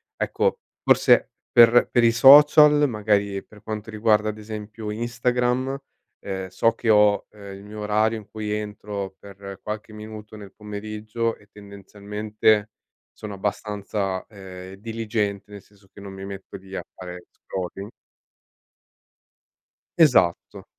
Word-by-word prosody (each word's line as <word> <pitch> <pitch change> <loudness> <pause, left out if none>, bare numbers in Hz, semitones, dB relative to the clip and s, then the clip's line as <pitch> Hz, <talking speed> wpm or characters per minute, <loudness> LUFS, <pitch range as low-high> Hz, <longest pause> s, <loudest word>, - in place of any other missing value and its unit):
ecco, 475 0 0 0.2
forse - - +4 0.2
per 120 0 +6
per 120 - +3
i 115 - +5
social, 145 +3 +7
magari 100 -2 0
per 105 -1 -17
quanto 110 0 -6
riguarda, 110 0 +2
ad 110 - -6
esempio, 105 0 -7
Instagram, 125 +3 -1 0.4
ehm, 95 -1 -5
so 95 +5 +2
che 115 0 -3
ho, 105 -1 +4
ehm, 100 -2 -11
il 100 - -13
mio 105 +1 -9
orario 110 +2 +1
in 105 -1 -11
cui 105 0 -5
entro 105 -2 -5
per 100 -1 -11
qualche 105 0 -6
minuto 110 0 -10
nel 100 -2 -12
pomeriggio 110 +2 -4
e 105 - -22
tendenzialmente 105 +1 -1 0.4
sono 105 -2 -8
abbastanza, 100 -1 -3
ehm, 95 -2 -11
diligente, 105 -2 -3
nel 100 -1 -10
senso 100 -1 -26
che - - -15
non 100 -1 -9
mi 95 0 -8
metto 100 -1 -9
lì 95 0 -11
a - - -4
fare 90 -1 -9
scrolling. 95 +2 -7 2.1
Esatto. 125 - +3
105 Hz, 135 wpm, -23 LUFS, 100-110 Hz, 2.1 s, social